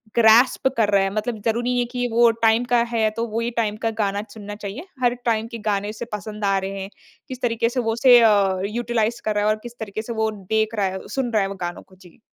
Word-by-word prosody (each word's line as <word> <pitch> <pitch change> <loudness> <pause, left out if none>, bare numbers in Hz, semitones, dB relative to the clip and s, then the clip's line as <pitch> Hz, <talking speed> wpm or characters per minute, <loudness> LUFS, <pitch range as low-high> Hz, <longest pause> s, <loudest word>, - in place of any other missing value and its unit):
Grasp 235 +3 +5
कर 220 -3 +3
रहा 195 - +5
है। 195 - 0
मतलब 215 +1 -3
ज़रूरी 230 +1 +1
नहीं 250 - +1
है 245 - +1
कि 245 -1 -1
वो 235 +1 +5
टाइम 225 +1 +2
का 245 0 +2 0.2
है, 220 -1 +2
तो 230 +2 -3
वो 225 +1 -3
ही 235 +1 -2
टाइम 220 -3 -1
का 225 - +1
गाना 200 0 0
चुनना 205 -1 -9
चाहिए। 210 - -7 0.2
हर 245 -1 +4
टाइम 225 -1 +1
के 235 - -5
गाने 205 0 0
उसे 215 +2 -6
पसंद 210 +1 -5
आ 195 0 +2
रहे 195 0 -4
हैं। 195 - -6 0.4
किस 255 -1 -8
तरीके 230 -1 +1
से 250 - -2
वो 225 -2 0
उसे 245 +1 +6
अ, 200 -4 +3
यूटिलाइज़ 235 +1 -1
कर 215 -1 0
रहा 205 - +1
है - - +3
और 215 - +3
किस 240 0 -10
तरीके 215 0 -5
से 235 +2 -6
वो 220 -1 0
देख 215 +2 -1
रहा 205 -2 +1
है, 190 0 -4
सुन 260 -3 -2
रहा 215 - +3
है 195 - 0
वो 200 - -6
गानों 175 - -6
को। 190 - -21
जी। 185 +2 -19
220 Hz, 270 wpm, -22 LUFS, 205-235 Hz, 0.4 s, उसे